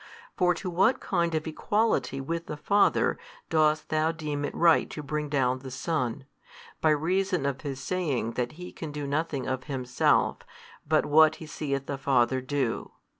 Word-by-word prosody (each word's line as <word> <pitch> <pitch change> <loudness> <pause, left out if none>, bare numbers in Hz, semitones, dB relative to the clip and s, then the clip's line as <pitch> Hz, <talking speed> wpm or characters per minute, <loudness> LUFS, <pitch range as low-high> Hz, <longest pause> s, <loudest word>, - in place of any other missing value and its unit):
For 180 -1 +3
to 175 - -6
what 185 +8 +3
kind 170 -3 0
of 155 - -1
equality 160 - 0
with 165 +5 -4
the 150 - -5
Father 200 +6 +2 0.3
dost 155 -1 +2
thou 155 +1 +2
deem 150 -3 -4
it - - -5
right 165 -1 +4
to 150 - -6
bring 150 +1 -3
down 130 -3 +1
the 130 0 -8
Son, 130 -2 -2 0.6
by 160 - +4
reason 180 +2 +1
of 140 -1 -2
His 135 -3 -5
saying 140 -7 -1
that 120 +2 -3
He 180 +3 -9
can 160 -3 -7
do 145 0 -4
nothing 145 -1 -2
of 130 -1 -3
Himself, 130 -3 +1 0.5
but 155 0 +3
what 155 +1 +5
He 160 - -9
seeth 140 -3 -3
the 140 -1 -4
Father 130 -1 +2
do? 130 -2 -2
150 Hz, 175 wpm, -27 LUFS, 135-165 Hz, 0.6 s, what